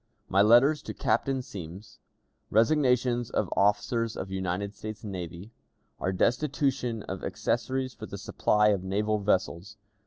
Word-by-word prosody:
My 100 - +4
Letter 120 +8 +6
to 150 0 -8
Captain 135 -2 0
Semmes. 100 +2 -10 0.5
Resignations 125 0 +2
of - - -1
Officers 110 +3 +1
of 95 - -5
United 95 +1 -2
States 110 0 -8
Navy. 90 0 -7 0.5
Our 95 - -1
Destitution 125 +1 0
of 95 -1 -6
Accessories 130 -1 -1
for - - -9
the - - -7
Supply 105 0 +2
of 100 -3 +1
Naval 105 +3 0
Vessels. 100 0 -1
105 Hz, 130 wpm, -28 LUFS, 95-125 Hz, 0.5 s, Letter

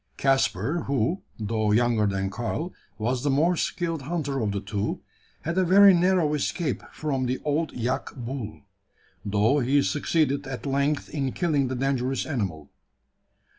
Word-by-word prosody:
Caspar, 135 - +1
who, 140 - 0 0.2
though 110 0 0
younger 115 -1 +3
than 95 -1 -1
Karl, 120 - -3 0.2
was 120 +3 -1
the 145 - +1
more 160 +6 +3
skilled 165 -2 -2
hunter 145 -2 -2
of 105 -2 0
the 100 - -2
two, 100 +1 -3 0.4
had 170 +4 -1
a - - +4
very 195 +2 +7
narrow 175 -3 +3
escape 150 0 -1
from 135 -4 -2
the 130 +1 0
old 155 +2 0
yak 125 +2 -2
bull; 120 - -6 0.6
though 105 +7 +2
he 140 +2 +3
succeeded 145 -2 0
at 135 0 -6
length 140 +2 0
in 135 -3 -1
killing 150 -6 +1
the 130 - -3
dangerous 135 0 0
animal. 95 - -3
135 Hz, 150 wpm, -26 LUFS, 115-155 Hz, 0.6 s, very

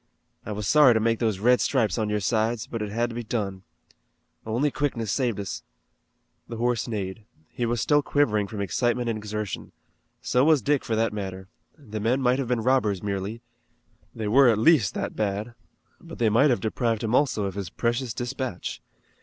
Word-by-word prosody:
I - - -3
was 105 -1 -3
sorry 145 -5 +6
to - - +3
make 115 0 +1
those 110 -5 0
red 125 +5 +3
stripes 115 -9 +1
on 110 -1 0
your 105 0 0
sides, 110 +2 0
but 115 - -5
it 105 - -3
had 120 +3 -1
to - - -8
be 120 - -4
done. 100 -4 -3 0.9
Only 125 +7 +1
quickness 120 -8 -2
saved 120 -4 0
us." 100 -3 -5 0.9
The 115 - -6
horse 120 +1 0
neighed. 105 -2 -4 0.3
He 120 - -2
was 120 -1 -1
still 145 0 +3
quivering 110 -9 +1
from 105 0 -5
excitement 120 +6 0
and 115 - -1
exertion. 105 -2 -5 0.5
So 125 - +1
was 155 -2 +4
Dick 145 -1 +1
for 115 - -1
that 110 0 +1
matter. 95 -2 -6 0.3
The 110 -8 -7
men 115 +5 +1
might 130 0 +2
have 135 - -2
been 125 -2 0
robbers 110 -7 +1
merely 100 +3 -4 0.7
they 110 -2 -3
were 130 +4 +6
at 110 - +3
least 115 - +4
that - - -3
bad 105 +2 -2 0.5
but - - -11
they 115 -2 +2
might 125 +8 +4
have 120 - +1
deprived 115 0 -1
him 110 +1 -1
also 130 -6 +2
of 95 - -3
his 100 -2 -5
precious 120 +4 -1
dispatch. 125 -3 -4
115 Hz, 195 wpm, -25 LUFS, 105-125 Hz, 0.9 s, sorry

